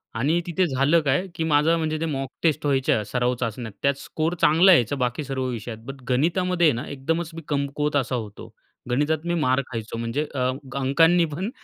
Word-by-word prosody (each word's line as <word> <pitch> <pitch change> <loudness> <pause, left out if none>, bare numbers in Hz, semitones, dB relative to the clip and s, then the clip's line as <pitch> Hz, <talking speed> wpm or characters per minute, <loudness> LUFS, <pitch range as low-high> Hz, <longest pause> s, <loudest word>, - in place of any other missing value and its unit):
आणि 145 +9 +1
तिथे 180 +2 +1
झालं 140 +4 +3
काय? 145 +5 +1
की 165 - -2
माझा 155 +1 +3
म्हणजे 155 -1 -2
ते - - 0
मॉक 135 -4 -3
टेस्ट 160 -3 +1
व्हायच्या, 135 -6 +2
सराव 125 +4 0
चाचण्या, 115 -1 -4
त्यात 140 - +3
स्कोर 160 +3 -2
चांगला 170 +5 +6
यायचा 125 -3 +3
बाकी 125 +2 -1
सर्व 135 -1 -3
विषयात 115 -1 -5
बट 135 0 -8
गणितामध्ये 170 +5 +2
ना 120 +2 -4
एकदमच 160 +4 -2
मी 165 - -7
कमकुवत 145 0 -1
असा 130 -2 0
होतो. 110 -4 -7 0.4
गणितात 150 +5 0
मी 170 - 0
मार 140 -5 +2
खायचो 115 -1 -5
म्हणजे 115 +6 -2
अ, 130 -1 +1 0.3
अंकांनी 165 +6 +4
पण 190 +7 -3
140 Hz, 185 wpm, -24 LUFS, 125-165 Hz, 0.4 s, चांगला